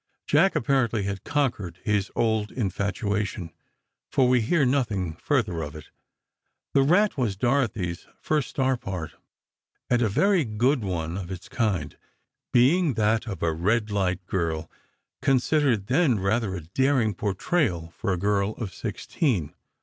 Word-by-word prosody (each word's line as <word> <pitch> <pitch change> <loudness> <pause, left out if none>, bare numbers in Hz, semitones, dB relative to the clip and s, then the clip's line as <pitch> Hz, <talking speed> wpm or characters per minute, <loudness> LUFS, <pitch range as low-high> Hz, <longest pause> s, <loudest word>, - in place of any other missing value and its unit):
Jack, 170 +7 +3
apparently, 120 -4 +1
had 100 -1 -4
conquered 115 - -1
his 105 -2 0
old 110 -2 +1
infatuation, 100 -3 -2 0.6
for 130 - +3
we 125 -1 +4
hear 140 +6 +2
nothing 110 - 0
further 105 - 0
of 75 0 -6
it. 75 - -11 0.8
"The 140 - +5
Rat" 180 +4 +3
was 110 -6 0
Dorothy's 115 -8 0
first 150 -4 0
star 130 -1 +1
part, 90 -8 -5 0.8
and 120 -1 +3
a 115 - +2
very 190 - +3
good 120 +3 +1
one 85 -3 -3
of 90 -3 -7
its 95 -2 -7
kind, 95 - -1 0.6
being 140 +4 +4
that 110 +2 +1
of 100 -5 -5
a 80 -1 +2
red 105 +6 0
light 90 -2 -1
girl, 80 -4 -2 0.5
considered 135 -4 +2
then 130 - +3
rather 95 +1 0
a 90 - -5
daring 120 - +1
portrayal 95 - -1
for 105 - -2
a 90 - 0
girl 100 +2 +1
of 105 -6 -6
sixteen. 95 - -2
110 Hz, 140 wpm, -26 LUFS, 95-130 Hz, 0.8 s, The